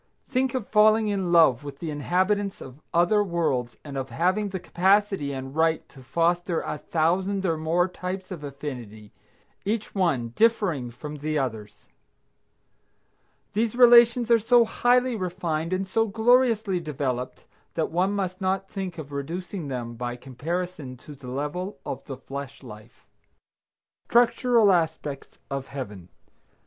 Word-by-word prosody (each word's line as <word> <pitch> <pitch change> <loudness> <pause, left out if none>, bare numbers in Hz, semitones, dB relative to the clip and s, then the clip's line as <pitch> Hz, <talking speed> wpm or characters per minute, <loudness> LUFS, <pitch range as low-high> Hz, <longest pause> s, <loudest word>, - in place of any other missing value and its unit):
Think 260 -1 0
of 245 -6 -3
falling 215 0 +4
in 190 -4 -1
love 155 -7 +5
with 140 -1 -8
the 160 +1 -5
inhabitants 190 +7 0
of 130 +3 -11
other 175 +5 +3
worlds 155 -10 -1
and 145 -2 -8
of 135 0 -5
having 190 +5 0
the 190 -1 -4
capacity 190 -3 +2
and 135 0 -6
right 160 0 +1
to 135 - -15
foster 170 +4 0
a 150 - -4
thousand 185 +6 0
or 165 -3 +2
more 165 +3 +1
types 185 +1 -6
of 170 -5 -6
affinity, 125 -7 -7 0.5
each 215 +2 -2
one 160 - +1
differing 180 - +1
from 150 +5 -8
the 155 +1 -2
others! 110 -6 -4 1.7
These 225 +2 0
relations 240 -1 +6
are 230 - +6
so 235 +2 +5
highly 245 +2 +2
refined 175 -4 -2
and 185 +1 -1
so 225 +4 +1
gloriously 225 -3 +3
developed 130 -6 -4 0.3
that 160 - -1
one 185 +4 +1
must 190 -1 -3
not 190 +1 0
think 190 -3 -5
of 145 -3 -8
reducing 165 +4 -5
them 120 -3 -4
by 120 +1 -4
comparison 140 +2 -5
to 150 - -12
the 135 -2 -12
level 150 +9 -4
of - - -5
the 135 -3 -7
flesh 135 +1 -8
life. 105 -3 -13 1.0
STRUCTURAL 240 -2 +4
ASPECTS 160 -5 -2
OF 135 -1 -3
HEAVEN. 105 -10 -7
170 Hz, 145 wpm, -25 LUFS, 140-200 Hz, 1.7 s, relations